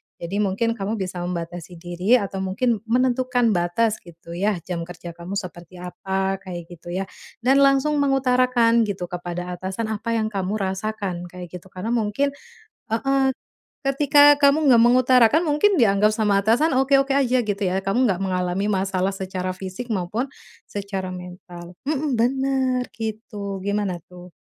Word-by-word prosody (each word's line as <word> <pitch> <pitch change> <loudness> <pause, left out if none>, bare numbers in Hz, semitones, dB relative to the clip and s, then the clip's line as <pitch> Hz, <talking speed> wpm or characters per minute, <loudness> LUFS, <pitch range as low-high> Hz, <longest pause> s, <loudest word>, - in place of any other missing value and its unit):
Jadi 185 +4 -4
mungkin 210 +3 +1
kamu 200 +3 -2
bisa 185 -3 -4
membatasi 175 0 -5
diri 175 +6 +1
atau 200 -5 -1
mungkin 210 +5 0
menentukan 250 -1 +2
batas, 190 +5 +1
gitu 170 0 -14
ya, 200 +4 0
jam 170 -2 -4
kerja 175 -1 -8
kamu 170 +3 -7
seperti 175 -2 -7
apa, 190 +2 -3
kayak 175 -3 -8
gitu, 175 0 -13
ya, 185 +2 -2 0.4
dan 270 +3 +4
langsung 275 +2 +3
mengutarakan 250 -4 +3
kepada 180 -2 -5
atasan 205 +4 -3
apa 225 +2 -2
yang 220 -1 -1
kamu 195 +1 -2
rasakan, 190 -2 -3
kayak 180 -1 -10
gitu. 190 - -19
Karena 190 +5 -5
mungkin 235 +5 0 0.6
heeh, 270 +1 +1 0.5
ketika 290 +1 +6
kamu 290 +1 +3
nggak 240 -4 +6
mengutarakan, 255 +5 +5
mungkin 320 +6 +3
dianggap 210 -3 +4
sama 210 -2 +2
atasan 245 +9 +3
oke-oke 270 +1 +3
aja, 255 -2 +3
gitu 205 0 -2
ya, 185 0 +1
kamu 205 +5 +1
nggak 185 - -1
mengalami 185 +1 -1
masalah 195 -1 0
secara 185 -1 -4
fisik 190 +5 -7
mau 175 -2 -3
pun 240 +6 -1 0.4
secara 195 -2 -5
mental, 180 -1 -10
mhm, 285 -3 -1
bener, 260 +1 +1 0.2
gitu, 210 -3 -5
gimana 200 -4 -2
tuh? 180 0 -12
205 Hz, 150 wpm, -23 LUFS, 185-250 Hz, 0.6 s, ketika